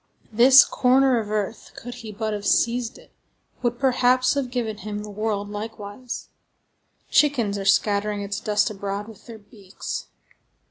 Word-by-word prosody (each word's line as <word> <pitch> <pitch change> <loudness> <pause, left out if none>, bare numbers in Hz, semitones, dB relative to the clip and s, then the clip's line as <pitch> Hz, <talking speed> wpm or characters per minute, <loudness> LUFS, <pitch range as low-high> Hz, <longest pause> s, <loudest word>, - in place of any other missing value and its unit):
This 255 +5 +8
corner 255 0 +3
of 210 -2 -5
earth, 215 +1 -4
could 245 +1 -8
he 220 -1 -8
but 215 +1 -3
have 205 -1 -5
seized 235 +2 +1
it, - - -19 0.5
would, 240 -1 -1
perhaps, 255 -1 +3
have 280 -3 -2
given 235 -4 -3
him 210 +1 -6
the 210 - -8
world 205 -1 -2
likewise. 210 +3 -7 0.8
Chickens 245 -9 +2
are 195 -1 -4
scattering 205 +1 +1
its 200 0 -4
dust 210 +1 +1
abroad 200 0 -5
with 220 -3 -14
their 230 -2 -9
beaks. 205 -2 -8
215 Hz, 150 wpm, -23 LUFS, 205-245 Hz, 0.8 s, This